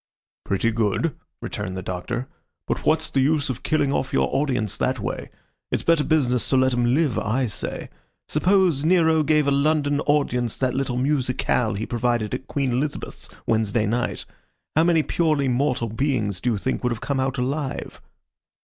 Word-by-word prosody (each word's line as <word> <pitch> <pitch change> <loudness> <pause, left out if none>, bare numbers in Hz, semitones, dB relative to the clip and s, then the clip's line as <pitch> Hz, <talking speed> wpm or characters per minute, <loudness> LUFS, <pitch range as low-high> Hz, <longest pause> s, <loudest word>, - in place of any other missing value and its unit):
"Pretty 100 +4 +1
good," 115 - 0 0.3
returned 95 0 -4
the 95 - -5
Doctor. 115 +8 -4 0.4
"But - - -3
what's 160 0 +2
the 135 - +2
use 145 0 +2
of 125 - -6
killing 145 -3 +1
off 130 - -1
your - - +2
audience 125 -7 0
that - - 0
way? - - -4 0.4
It's - - 0
better 165 -3 +3
business 125 -8 +2
to 135 - +3
let 130 0 +3
'em 120 +1 +2
live, 150 -5 +1
I 125 +5 0
say. 110 - -5 0.4
Suppose 180 -3 +2
Nero 160 -2 +4
gave 150 -1 +3
a 140 - +2
London 145 0 +2
audience 125 -6 +1
that 130 -1 0
little 130 -2 -1
musicale 125 -4 0
he 105 - -3
provided 120 -2 -1
at 130 +1 -4
Queen 140 -3 -1
Elizabeth's 140 +5 -3 0.2
Wednesday 110 -1 +1
night. 120 +4 -1 0.5
How 160 +2 +4
many 165 -2 +3
purely 155 -5 +1
mortal 125 -2 0
beings, 110 -5 -1
do 125 - +1
you - - -1
think, 130 +6 -2
would 125 - +1
have 115 - -3
come 140 +1 -2
out 135 +1 -1
alive?" 135 +2 -3
130 Hz, 175 wpm, -23 LUFS, 120-150 Hz, 0.5 s, Nero